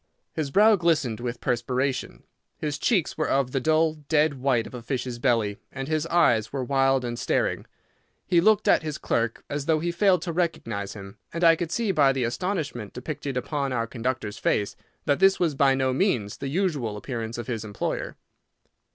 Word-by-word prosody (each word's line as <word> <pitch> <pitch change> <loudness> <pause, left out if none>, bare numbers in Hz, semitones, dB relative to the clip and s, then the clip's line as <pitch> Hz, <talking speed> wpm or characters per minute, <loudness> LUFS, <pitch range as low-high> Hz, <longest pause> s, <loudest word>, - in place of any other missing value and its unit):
His 155 -3 -2
brow 210 +7 +5
glistened 155 - +1
with 120 -1 -4
perspiration, 130 +2 -1 0.3
his 150 -2 -3
cheeks 185 -8 +1
were 155 - 0
of 135 -2 +1
the 135 - 0
dull, 155 +3 +2 0.2
dead 155 -1 +3
white 125 -4 +2
of - - -11
a 125 - -6
fish's 125 0 -4
belly, 115 -5 +1
and 135 0 -5
his 155 +1 -1
eyes 140 -11 +3
were 135 -2 -2
wild 135 0 +2
and 120 -1 -4
staring. - - 0 0.6
He 170 -1 +3
looked 215 +2 +3
at - - +5
his 155 -2 -4
clerk 115 0 -1
as 145 -1 -4
though 160 -1 +4
he 170 +2 -1
failed 180 -1 +3
to 170 - -3
recognise 115 - -2
him, 100 0 -11
and 170 +1 -3
I 165 -1 +7
could 165 0 -4
see 225 0 0
by 140 -6 +4
the 130 -2 -1
astonishment 140 - -3
depicted 135 +1 -5
upon 140 +1 -2
our 115 -2 0
conductor's 115 -2 -3
face 105 -1 0 0.3
that 140 - +2
this 195 0 +5
was 170 -4 +1
by 135 -1 +3
no 130 -1 +1
means 125 - 0
the 140 - -5
usual 145 - -1
appearance 115 0 -5
of 120 - -5
his 115 -4 -3
employer. 105 -2 -4
135 Hz, 190 wpm, -25 LUFS, 120-160 Hz, 0.6 s, I